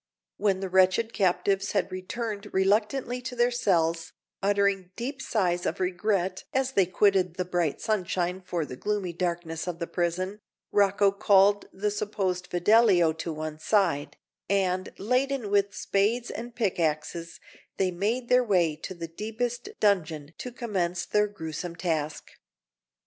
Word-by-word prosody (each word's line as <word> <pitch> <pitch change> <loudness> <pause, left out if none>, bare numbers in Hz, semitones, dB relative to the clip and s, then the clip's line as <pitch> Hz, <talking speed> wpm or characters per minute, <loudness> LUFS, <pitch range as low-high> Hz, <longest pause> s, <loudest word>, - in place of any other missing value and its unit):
When 195 -2 +1
the 190 - -3
wretched 190 +5 +3
captives 195 0 +1
had 195 -4 0
returned 205 +3 -4
reluctantly 215 +6 +1
to 250 0 -6
their 240 0 +3
cells, 165 -8 +1 0.3
uttering 200 -2 +1
deep 265 +4 -4
sighs 175 -5 0
of 160 - -2
regret 185 0 0
as 265 0 +1
they 195 -8 +3
quitted 185 -2 +2
the 180 - -2
bright 175 -4 -1
sunshine 185 -3 -1
for 175 -3 -2
the 130 - -8
gloomy 195 +3 -2
darkness 170 -1 -3
of 175 -2 -3
the 170 - -3
prison, 185 +4 -2 0.3
Rocco 200 0 +4
called 200 0 +4
the 205 +2 -1
supposed 195 -3 -2
Fidelio 180 -2 +4
to 165 +1 -5
one 155 0 -5
side; 170 -6 +1 0.3
and, 185 -2 +1
laden 250 0 0
with 200 0 +2
spades 225 +5 0
and 235 +1 -7
pickaxes, 170 -5 -1 0.4
they 190 -1 +1
made 220 +8 -1
their 250 +1 +5
way 180 -8 +2
to 185 +4 -7
the 170 -1 -6
deepest 225 +7 -4
dungeon 165 -7 +1
to 250 - -5
commence 185 -8 -2
their 210 0 +2
gruesome 170 -3 -6
task. 155 -4 -2
190 Hz, 145 wpm, -27 LUFS, 175-210 Hz, 0.4 s, their